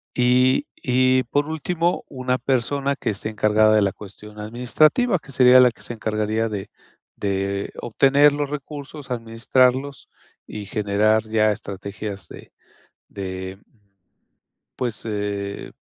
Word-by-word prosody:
Y 125 +1 +3 0.2
y, 130 0 +3
por 145 +4 -1
último, 165 +2 -1
una 130 -1 -2
persona 135 +2 0
que 115 - -2
esté 105 +1 -3
encargada 110 0 +3
de 105 - +4
la 100 -2 +1
cuestión 105 +1 -12
administrativa, 150 - +2
que 145 - -15
sería 130 -1 +6
la 125 -1 +6
que - - -17
se 120 - -6
encargaría 110 0 -1
de 100 -2 -6 0.4
de 100 0 -2
obtener 140 +5 +4
los 145 -1 -2
recursos, 145 0 -8
administrarlos 125 +3 0 0.4
y 105 -1 -7
generar 105 +2 +1
ya 110 -1 +3
estrategias 100 -2 -7
de - - -13 0.6
de, 95 -1 -6
mm, 115 - -35 1.0
pues, 120 -4 -3
eh. 100 -2 -4
115 Hz, 130 wpm, -22 LUFS, 105-135 Hz, 1.0 s, sería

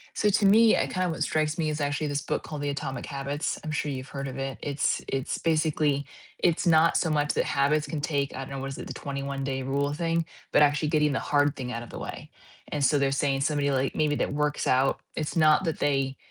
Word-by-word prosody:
So 210 - +2
to 205 0 +2
me, 220 +3 +6
uh, - - +1
kind 185 0 -1
of 175 - 0
what 160 - -1
strikes 155 0 0
me 160 -2 0
is 150 0 -3
actually 145 +1 -1
this 145 0 -1
book - - -2
called 150 -2 -6
"The 145 - -1
Atomic 135 -2 -4
Habits," 140 +1 -3
I'm 155 - -4
sure 150 -1 -1
you've 130 0 -6
heard 140 -1 -5
of 130 0 -6
it, 135 0 -4
it's 140 -1 0
it's 135 -1 -2
basically 155 -3 +1 0.3
it's 170 0 +2
not 165 0 +5
so 165 - +1
much 150 -1 +1
that - - +1
habits 145 +2 +1
can 155 -3 -3
take, 140 -2 -1
I - - -5
don't 135 - -6
know, 135 - -4
what 135 +1 -4
is - - -7
it, - - -7
the - - -5
twenty-one-day 140 -1 -4
rule 140 +2 0
thing, 165 +1 0 0.3
but - - +5
actually 150 +1 +3
getting 150 -1 +2
the - - 0
hard 145 -1 +2
thing 125 -2 -5
out 115 -1 -4
of 120 - -12
the - - -7
way, - - -7 0.4
and 145 -1 -1
so 145 +2 +4
they're 140 -1 +2
saying 135 0 0
somebody, 145 0 +1
like, 135 0 0
maybe 150 -1 +1
that - - -1
works 150 0 0
out, 130 +1 +2 0.2
it's 155 -1 -3
not 155 +2 +4
that 165 -3 -2
they, 135 -1 0
145 Hz, 250 wpm, -27 LUFS, 135-155 Hz, 0.4 s, me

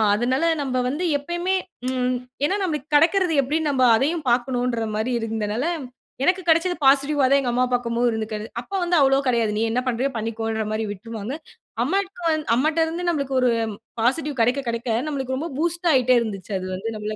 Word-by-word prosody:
அதனால 255 +8 +1 0.2
நம்ப 255 -2 -2
வந்து 305 +7 -3 0.2
எப்பயுமே 345 +5 -1 0.3
ம் 255 -1 0 0.3
ஏன்னா, 380 - +1
நம்மளுக்கு 305 -4 -3
கெடைக்கிறது 345 +2 +4
எப்பிடின்னு 300 +3 -1
நம்ப 260 -2 +3
அதையும் 300 +6 0
பார்க்கணும்ன்றமாரி 240 -2 0
இருந்தனால, 225 +3 -2 0.6
எனக்கு 365 +4 +2
கெடைச்சது 335 +2 +3
பாசிட்டிவ்வா 280 +1 +4
தான் 280 - +5
எங்க 245 -2 -1
அம்மா 250 - +2
பார்க்கும்போது 240 0 +1
இருந்துருக்கு 220 -1 -3
அது. 215 - -6
அப்போ 320 +11 -7
வந்து 350 0 +1
அவ்வளவு 270 0 +3
கெடையாது. 235 -4 +2
நீ - - 0
என்ன 250 +2 +1
பண்றியோ! 255 +3 0
பண்ணிக்கோன்றமாரி 220 -1 -2
விட்டுருவாங்க. 220 +4 -6 0.5
அம்மாக்கு 380 +5 -2
வந் 310 -1 0
அம்மாட்டருந்து 320 +5 0
நம்பளுக்கு 275 -5 -1
ஒரு 250 -1 +3 0.5
பாசிட்டிவ் 275 +3 0
கெடைக்க, 245 +5 +2
கெடைக்க, 235 +1 -2 0.2
நம்மளுக்கு 265 -3 -2
ரொம்ப 325 +4 -4
பூஸ்ட் 340 +1 0
ஆயிட்டே 255 -1 +4
இருந்துச்சு, 205 -3 -5
அது 185 - -5
வந்து 225 +5 -4
நம்பள 215 0 -4
260 Hz, 165 wpm, -23 LUFS, 230-310 Hz, 0.6 s, தான்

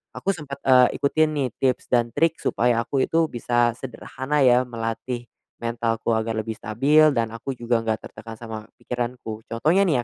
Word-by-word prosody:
aku 195 - 0
sempet, 150 -7 -6
eee, 125 -1 +5
ikutin 155 +2 +2
nih 135 -3 0
tips 130 -2 +1
dan 120 -1 +2
trik 165 0 +2
supaya 120 -1 +1
aku 135 +2 0
itu 165 0 +2
bisa 120 0 +1
sederhana 130 +3 -4
ya 125 0 +5
melatih 120 +1 -4 0.3
mentalku 115 -1 -1
agar 110 0 -1
lebih 110 0 -3
stabil, 145 +8 +4
dan 115 -2 0
aku 120 +4 -5
juga 120 -1 0
nggak 110 -1 -2
tertekan 115 +1 -10
sama 115 -1 -7 0.2
pikiranku. 120 -3 -5
Contohnya 160 +12 +2
nih 135 -8 +2
120 Hz, 165 wpm, -24 LUFS, 115-135 Hz, 0.3 s, eee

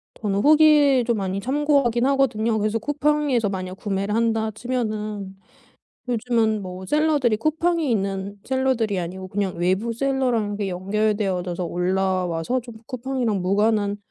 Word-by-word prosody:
저는 200 -2 -1
후기 295 -1 +5
좀 235 -1 +1
많이 195 -1 -2
참고하긴 265 -1 +1
하거든요. 230 -5 +1
그래서 215 +1 0
쿠팡에서 290 -3 +1
만약 185 -1 -5
구매를 200 +1 -2
한다 225 -1 +1
치면은 215 -4 -4 0.7
요즘은 225 -3 +1
뭐 185 0 -7
셀러들이 295 -4 +2
쿠팡에 330 +5 0
있는 195 -2 -2
셀러들이 260 -6 0
아니고 185 +2 -5
그냥 195 -2 -2
외부 190 +7 0
셀러랑 245 -4 0
그 200 -1 -2
연결되어져서 190 -2 -1
올라와서 180 +3 -1
좀 240 -1 -11
쿠팡이랑 250 -5 -2
무관한 205 +2 +1
215 Hz, 330 characters per minute, -23 LUFS, 195-255 Hz, 0.7 s, 후기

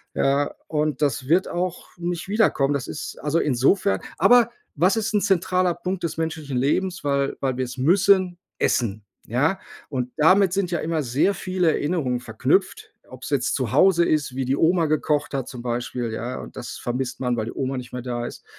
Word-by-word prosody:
Ja, 140 +1 +1
und 150 -3 -1
das 130 -3 0
wird 180 +4 +3
auch 180 0 -3
nicht 175 0 -4
wiederkommen. 200 -10 +2
Das 140 -1 -2
ist 150 - -6
also, 150 +3 +1
insofern 150 +9 +2 0.2
aber 240 -1 +5 0.2
was 180 +8 +3
ist 220 0 -1
'n 205 - +3
zentraler 185 -2 +2
Punkt 180 +1 -4
des 165 - -3
menschlichen 160 -4 -3
Lebens, 180 +8 0
weil 140 -1 0
weil 130 -2 -1
wir 130 - 0
es 125 +2 -8
müssen? 185 +3 +3 0.2
Essen, 110 -3 0 0.2
ja. 145 - +1 0.3
Und 125 -3 -3
damit 185 +4 +5
sind 195 -2 0
ja 170 - 0
immer 160 -1 -1
sehr 135 +11 +1
viele 185 -3 0
Erinnerungen 145 -6 -1
verknüpft, 185 - 0
ob's - - -9
jetzt - - +1
zu - - -2
Hause 180 -3 +5
ist, 150 -4 0
wie 130 0 -1
die 130 +2 +1
Oma 165 +2 +3
gekocht 150 -1 0
hat 135 -2 -2
zum 125 - -8
Beispiel, 120 -1 -3
ja, 120 +3 -4
und - - -11
das 120 -2 -7
vermisst 125 +1 -3
man, 125 -2 0
weil 110 - -1
die 115 - -5
Oma 135 0 -2
nicht 125 -1 -7
mehr 125 - -4
da 120 -1 -3
ist, - - -11
150 Hz, 195 wpm, -23 LUFS, 130-180 Hz, 0.3 s, aber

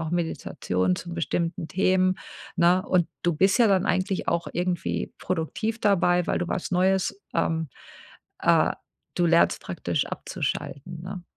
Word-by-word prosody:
auch 160 0 -3
Meditation 95 - -1
zu 175 0 -7
bestimmten 170 0 -2
Themen, 185 0 +2 0.4
ne? 175 +2 +4
Und 175 -3 +2 0.2
du 175 - +3
bist 195 +8 +3
ja 235 - +6
dann 195 -1 +3
eigentlich 185 0 0
auch 170 0 0
irgendwie 180 0 -2
produktiv 215 +7 -2
dabei, 180 -3 +3
weil - - +1
du 175 - -2
was 185 - -3
Neues 190 +2 +1
ähm, 160 -1 0 0.7
äh, - - +4 0.5
du 175 - +3
lernst 170 0 +4
praktisch - - -2
abzuschalten, 160 +4 -4
ne? 185 0 -6
175 Hz, 145 wpm, -26 LUFS, 170-185 Hz, 0.7 s, ja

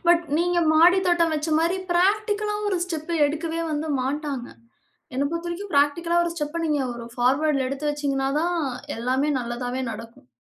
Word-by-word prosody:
But 345 0 +5 0.2
நீங்க 350 +1 +2
மாடி 350 +4 +6
தோட்டம் 340 -2 +3
வச்ச 305 +1 -2
மாரி 335 +3 +1 0.2
பிராக்டிகலா 420 +3 +1
ஒரு 380 -3 0
ஸ்டெப்ப 320 -2 -5 0.2
எடுக்கவே 320 +3 -3
வந்து 305 +1 -2
மாட்டாங்க. 275 -1 -3 0.7
என்ன 265 +2 0
பொறுத்தவரைக்கும் 345 +3 -4
பிராக்டிகலா 335 +5 +3
ஒரு 340 - -2
ஸ்டெப்ப 300 +1 -3
நீங்க 300 -3 +1
ஒரு 235 0 -7
ஃபார்வர்ட்டுல 270 +3 +2
எடுத்து 280 +2 -2
வச்சீங்கனா 275 -2 -1
தான் 350 +1 0 0.4
எல்லாமே 260 +5 0
நல்லதாவே 245 +1 -3
நடக்கும். 225 - -10
310 Hz, 150 wpm, -24 LUFS, 270-345 Hz, 0.7 s, மாடி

